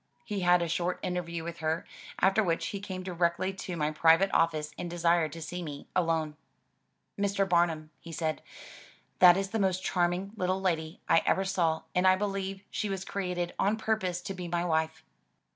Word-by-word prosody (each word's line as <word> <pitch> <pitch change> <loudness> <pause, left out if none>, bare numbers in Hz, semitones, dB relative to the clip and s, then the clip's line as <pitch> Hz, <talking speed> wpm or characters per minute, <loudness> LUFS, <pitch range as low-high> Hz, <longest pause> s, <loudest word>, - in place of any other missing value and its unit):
He 205 -2 -3
had 180 -1 +4
a - - -1
short 175 +2 -1
interview 170 -2 -3
with 170 0 -6
her, 160 +1 -1 0.3
after 195 +3 +4
which 165 -3 0
he 200 - -4
came 190 -2 -6
directly 180 +1 0
to 185 -2 -6
my 150 -1 0
private 165 +5 +4
office 155 -2 +1
and 175 - -5
desired 170 -2 +2
to 165 -1 -7
see 180 +2 -5
me 145 -4 -7
alone. 165 -3 +1 0.4
" - - -24
Mr. 200 -1 +1
Bamum," 170 -3 +1
he 170 - -10
said, 160 -1 -2 0.8
that 180 -1 +8
is 195 0 -2
the 225 - -1
most 190 -1 +1
charming 180 +2 0
little 185 -2 0
lady 165 -4 -2
I 165 - +5
ever 190 - +2
saw 170 -4 +1
and 180 +1 +3
I 185 - +7
believe 195 -1 -3
she 210 - -2
was 195 -1 -3
created 180 -3 -3
on 205 +3 +2
purpose 215 -6 -1
to 195 - -4
be 180 -2 -6
my 175 0 -1
wife." 160 -1 0
175 Hz, 190 wpm, -29 LUFS, 165-190 Hz, 0.8 s, that